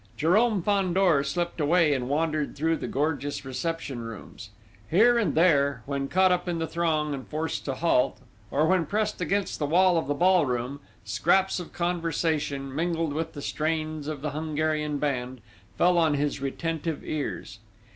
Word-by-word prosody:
Jérôme 200 +5 +3
Fandor 185 -6 +2
slipped 170 +4 -2
away 155 0 +4
and 130 -2 -2
wandered 155 0 -1
through 160 +3 +1
the - - -5
gorgeous 145 -1 -2
reception 135 0 -3
rooms. 115 -2 -9 0.4
Here 235 +7 +5
and 220 - 0
there, 140 -4 +3
when 140 -1 -2
caught 185 +4 +3
up 180 0 0
in 170 - -1
the 165 - -1
throng 160 -2 0
and 135 -2 -6
forced 155 +1 -3
to 135 - -2
halt, 145 -4 +2 0.3
or 150 +3 +2
when 180 -2 +2
pressed 210 -2 -1
against 195 +3 -1
the 145 - 0
wall 180 +2 +4
of 160 - -5
the 145 - 0
ball 180 -1 +4
room, 125 +3 -3 0.3
scraps 190 +3 +2
of 175 - -8
conversation, 160 -5 -1
mingled 165 0 -1
with 160 +2 -3
the 145 - -7
strains 155 -1 -2
of 150 -2 -5
the 150 - -2
Hungarian 155 0 -1
band, 130 -3 -2 0.4
fell 175 0 +4
on 160 -3 +3
his 145 -1 -1
retentive 160 +3 -3
ears. 140 -8 -4
155 Hz, 165 wpm, -26 LUFS, 145-175 Hz, 0.4 s, Here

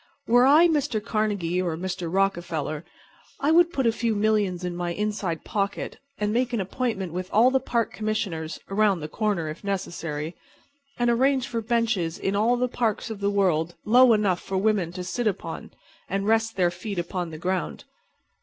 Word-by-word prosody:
Were 245 +2 +5
I 310 +5 +7
Mr. 295 -8 0
Carnegie 205 -5 -1
or 170 -3 -2
Mr. 180 -1 -4
Rockefeller 170 -5 -1 0.6
I 290 +3 +2
would 345 +1 +5
put 270 -7 -1
a 230 - +5
few 230 -1 -1
millions 205 -4 +1
in 180 -1 -3
my 175 0 -2
inside 205 -5 -2
pocket 200 -2 -2 0.2
and 210 0 -1
make 250 +1 0
an 235 - +1
appointment 195 -3 -2
with 185 +1 -4
all 235 +5 +5
the 265 - +3
Park 235 -3 -1
Commissioners 195 -7 -3
(around 200 -3 +2
the 150 - -4
corner, 200 -2 -1
if 155 +5 -7
necessary), 170 -5 -3 0.6
and 240 0 +2
arrange 260 +2 +2
for 230 -1 -2
benches 220 -7 0
in 195 - -1
all 230 +4 +3
the 250 +1 +1
parks 230 -2 -1
of 215 - -6
the 200 0 +1
world 175 -5 +1
low 245 +2 +6
enough 200 -4 +1
for 190 - -3
women 195 -4 +1
to 180 0 -5
sit 220 +6 -2
upon, 170 -5 -4 0.4
and 195 +1 -1
rest 225 +1 +2
their 180 -2 +2
feet 185 +3 -6
upon 175 0 -3
the 160 - -8
ground. 185 +3 -2
200 Hz, 180 wpm, -25 LUFS, 175-230 Hz, 0.6 s, I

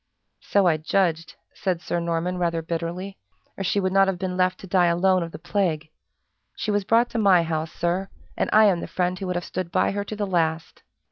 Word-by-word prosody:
"So 200 -1 +1
I 165 -3 +3
judged," 165 0 0 0.2
said 185 -3 -2
Sir 175 - -2
Norman, 170 +2 -2
rather 170 -2 0
bitterly, 170 +4 -4 0.4
"or 195 - -4
she 200 +2 +1
would 185 -1 -1
not 195 0 +5
have 190 -2 -1
been 180 0 -3
left 185 0 +1
to - - -9
die 180 -1 +3
alone 185 +2 +3
of 165 -1 -4
the - - -8
plague. 165 -4 -1 0.7
She 215 - -2
was 205 -1 +1
brought 230 +4 +2
to 230 - -2
my 190 -5 +5
house, 160 -1 -3
sir, 180 +4 -2 0.3
and - - -1
I 215 0 +6
am 190 -4 +3
the - - -5
friend 180 0 -1
who 190 - -4
would 180 - -2
have 175 - -2
stood 180 -2 -4
by - - +2
her 200 +1 -2
to 215 - -6
the 205 -1 -2
last!" 165 -3 -1
180 Hz, 225 wpm, -24 LUFS, 170-195 Hz, 0.7 s, I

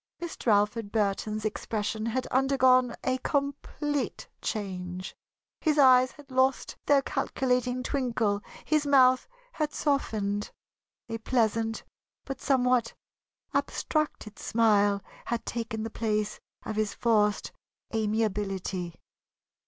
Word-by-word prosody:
Mr. 345 -6 -7
Alfred 210 +1 +2
Burton's 215 0 0
expression 215 +1 -2
had 255 +3 -1
undergone 255 -2 +4
a 255 0 0
complete 285 +1 -2
change. 185 -3 -4 0.4
His 310 -2 +1
eyes 255 -2 +7
had 290 -2 -16
lost 260 +1 +1
their 280 -1 +5
calculating 250 -1 0
twinkle, 230 -7 0 0.2
his 305 -2 +1
mouth 255 -2 +5 0.2
had 305 -9 -2
softened. 210 -8 0 0.6
A 225 -1 -4
pleasant 225 -1 0 0.4
but 270 -1 -6
somewhat 250 -3 +2 0.6
abstracted 300 -9 -1
smile 205 -3 +3 0.2
had 235 0 -2
taken 225 -2 -3
the 225 - -4
place 215 -2 -1 0.3
of 215 - -4
his 215 -1 0
forced 210 -3 +2 0.4
amiability. 200 -5 -1
230 Hz, 105 wpm, -28 LUFS, 210-260 Hz, 0.6 s, eyes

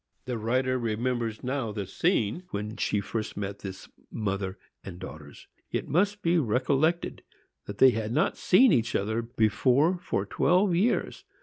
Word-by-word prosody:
The 125 -3 -3
writer 130 +3 0
remembers 115 0 -2
now 130 -3 -2
the 105 -2 -4
scene 160 - 0
when 105 +2 -4
she 105 -3 0
first 110 +2 -4
met 100 0 -4
this 95 -1 -8 0.2
mother 100 -3 -3 0.3
and 90 -3 -8
daughters. 80 -5 -10 0.2
It - - -3
must 200 +5 +1
be 170 +1 +3
recollected 140 +6 0 0.5
that 105 - -6
they 130 - +7
had 110 -1 -3
not - - +1
seen 245 +7 +5
each 120 -4 +1
other 110 +3 0
before 125 - +2
for - - -2
four 185 +1 +2
years. 200 +8 0
115 Hz, 150 wpm, -27 LUFS, 105-145 Hz, 0.5 s, they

